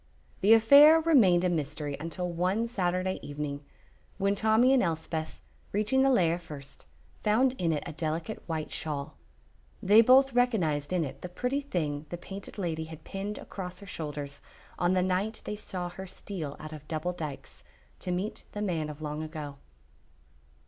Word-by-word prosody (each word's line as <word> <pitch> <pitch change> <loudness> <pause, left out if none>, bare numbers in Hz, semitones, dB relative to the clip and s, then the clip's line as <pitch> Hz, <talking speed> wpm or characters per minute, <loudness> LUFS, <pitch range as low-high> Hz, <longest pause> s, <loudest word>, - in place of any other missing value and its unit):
The 210 +3 +6
affair 285 +8 +8
remained 230 - +5
a 180 - +3
mystery 150 -3 -2
until 170 +3 -4
one 185 +6 0
Saturday 185 -3 -1
evening, 145 0 -5 0.5
when 200 +1 +2
Tommy 220 +5 +4
and 265 - +5
Elspeth, 160 -2 -3 0.3
reaching 215 +6 +2
the 270 - +5
lair 175 -9 +3
first, 150 -5 -11 0.3
found 245 +5 +3
in 170 -2 +1
it 150 - -1
a 170 - -5
delicate 160 +6 -3
white 160 -2 -3
shawl. 145 -3 -4 0.6
They 210 +3 +7
both 260 +3 +6
recognized 180 - +1
in 180 -2 +1
it 135 -3 -7
the 180 - -6
pretty 250 +10 -1
thing 155 - -3
the 175 - -4
Painted 195 +4 -9
Lady 165 -5 -2
had 160 -1 -11
pinned 200 +2 -5
across 180 -2 -7
her 200 - -11
shoulders 145 -5 -5 0.4
on 175 +1 +3
the 185 -1 +2
night 190 +4 -1
they 210 - -3
saw 180 -4 -5
her 190 +2 -8
steal 170 -6 -6
out 155 0 -8
of 150 -1 -10
Double 160 +2 -2
Dykes, 155 -6 -7 0.4
to - - -5
meet 185 +4 -2
the 210 - -4
man 165 -6 -1
of 150 +1 -8
long 150 0 -3
ago. 155 -3 -6
180 Hz, 170 wpm, -29 LUFS, 155-210 Hz, 0.6 s, affair